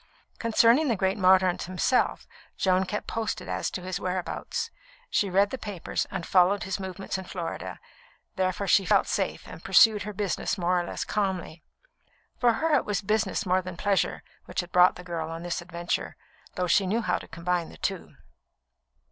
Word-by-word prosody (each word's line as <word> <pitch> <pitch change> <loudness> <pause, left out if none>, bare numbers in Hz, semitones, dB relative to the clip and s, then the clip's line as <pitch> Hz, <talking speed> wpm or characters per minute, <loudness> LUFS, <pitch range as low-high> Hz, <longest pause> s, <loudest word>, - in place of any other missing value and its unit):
Concerning 230 +5 +4
the 235 - +2
great 190 0 +1
Mordaunt 185 -1 +4
himself 185 +8 0 0.3
Joan 185 0 +2
kept 210 +2 -4
posted 225 -1 -3
as - - -2
to 180 - -6
his 185 0 -3
whereabouts. 185 -1 -3 0.4
She 200 - +2
read 200 +2 +3
the 265 - -4
papers 200 -5 -3
and 170 - -4
followed 190 +2 +3
his 190 +1 -3
movements 190 0 -4
in 190 - -8
Florida; 175 -2 -5 0.6
therefore 185 +1 0
she 195 +1 +4
felt - - +3
safe - - -2
and - - -10
pursued 220 -4 +6
her 210 +1 -4
business 200 -1 -2
more 180 0 +1
or - - -5
less - - -4
calmly. 190 -5 -2 0.8
For 245 - +4 0.2
it 280 - +4
was 205 0 -2
business 215 0 0
more 185 0 +2
than 185 -1 -8
pleasure 200 0 0 0.2
which - - -2
had 175 0 -12
brought 180 0 +6
the 180 - -10
girl 165 -3 -4
on 165 +1 -6
this 175 -1 -3
adventure, 170 0 -3 0.4
though 180 - 0
she 185 +2 +3
knew 220 +5 +1
how - - 0
to - - -11
combine 170 0 -2
the - - -13
two. - - -4
185 Hz, 180 wpm, -27 LUFS, 180-205 Hz, 0.8 s, pursued